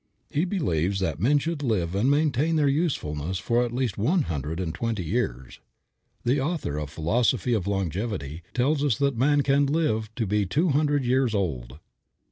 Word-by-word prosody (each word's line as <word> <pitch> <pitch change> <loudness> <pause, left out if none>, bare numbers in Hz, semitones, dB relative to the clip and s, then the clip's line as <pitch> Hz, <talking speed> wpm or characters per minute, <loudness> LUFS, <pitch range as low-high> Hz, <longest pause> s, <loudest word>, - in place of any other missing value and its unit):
He 155 +5 +1
believes 95 - 0
that 80 -6 -2
men 135 - +3
should 160 +1 -2
live 100 - 0
and 105 +7 +2
maintain 150 +2 +2
their 150 -2 +3
usefulness 95 - -1
for 120 +7 +1
at 120 - -3
least 120 -5 -2
one 155 - +2
hundred 80 - -4
and 85 -4 -2
twenty 115 -1 -2
years. 75 - -3 0.7
The 130 +4 +2
author 140 - -2
of 75 -2 -4
"Philosophy 110 - +1
of 100 -4 -1
Longevity" 95 - -3
tells 140 +4 +1
us 135 -8 +2
that 140 -2 +1
man 145 +5 +3
can 140 +1 +3
live 125 -8 0
to 115 - -1
be 105 0 0
two 160 - +1
hundred 145 -1 +1
years 125 -2 +2
old. 65 -10 -2
115 Hz, 175 wpm, -26 LUFS, 90-145 Hz, 0.7 s, men